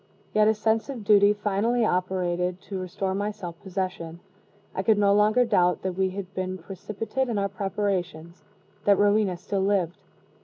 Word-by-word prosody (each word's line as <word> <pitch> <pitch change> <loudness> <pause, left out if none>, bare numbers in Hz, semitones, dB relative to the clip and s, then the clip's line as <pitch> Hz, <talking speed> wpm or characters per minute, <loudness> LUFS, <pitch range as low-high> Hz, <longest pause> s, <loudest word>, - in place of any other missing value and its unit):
Yet 215 0 +4
a 220 - +3
sense 220 +2 0
of 250 -6 -5
duty 205 0 +6
finally 210 +3 0
operated 180 -1 -1
to 195 -2 -6
restore 185 +1 -3
my 205 +2 -1
self 180 -5 -8
possession. 185 -3 -4 0.5
I - - -1
could 215 +2 +3
no 200 -1 +4
longer 215 +4 +4
doubt 180 -5 +2
that 185 -1 -1
we 190 +1 0
had 190 0 -7
been 185 0 -3
precipitate 215 +8 -4
in 225 - -1
our 200 0 0
preparations 185 -4 -3 0.4
that 200 -1 +5
Rowena 205 -2 +2
still 195 +2 -2
lived. 190 -3 0
195 Hz, 165 wpm, -26 LUFS, 185-210 Hz, 0.5 s, duty